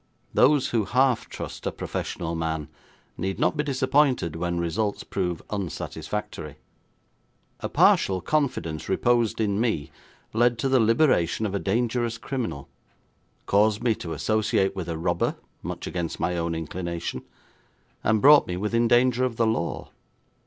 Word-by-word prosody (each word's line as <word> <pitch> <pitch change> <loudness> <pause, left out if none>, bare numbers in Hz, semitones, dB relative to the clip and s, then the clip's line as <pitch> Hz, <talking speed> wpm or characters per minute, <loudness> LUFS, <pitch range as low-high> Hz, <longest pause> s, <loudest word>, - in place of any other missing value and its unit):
Those 145 0 +4
who 115 -4 +1
half 125 +3 +2
trust - - -6
a - - 0
professional 85 -1 -4
man 80 -2 -3 0.5
need 95 +2 -2
not - - +1
be 150 - 0
disappointed 135 - +1
when 85 +1 -2
results 95 +5 -1
prove 90 -3 -3
unsatisfactory. 100 -5 -5 1.0
A - - -4
partial 95 -1 +4
confidence 90 - -1
reposed 120 -2 +2
in 105 -1 +1
me 110 -12 -1 0.4
led 120 +1 +3
to 135 - 0
the 130 -1 +4
liberation 110 - +3
of 100 - -2
a 100 - 0
dangerous 115 +3 0
criminal, 115 - -4 0.8
caused 105 +2 +2
me 120 -2 +3
to 85 -6 -6
associate 110 -3 +1
with 90 -3 -4
a 80 - -2
robber 80 - 0 0.3
much - - -5
against 85 -2 -4
my 90 - 0
own 85 -1 -1
inclination, 85 +1 -4 0.8
and 110 0 +2
brought 145 +1 +8
me 90 - -3
within 115 +4 +1
danger 120 +1 +3
of 125 -2 0
the 115 - +2
law. 110 -6 -2
110 Hz, 145 wpm, -25 LUFS, 85-120 Hz, 1.0 s, brought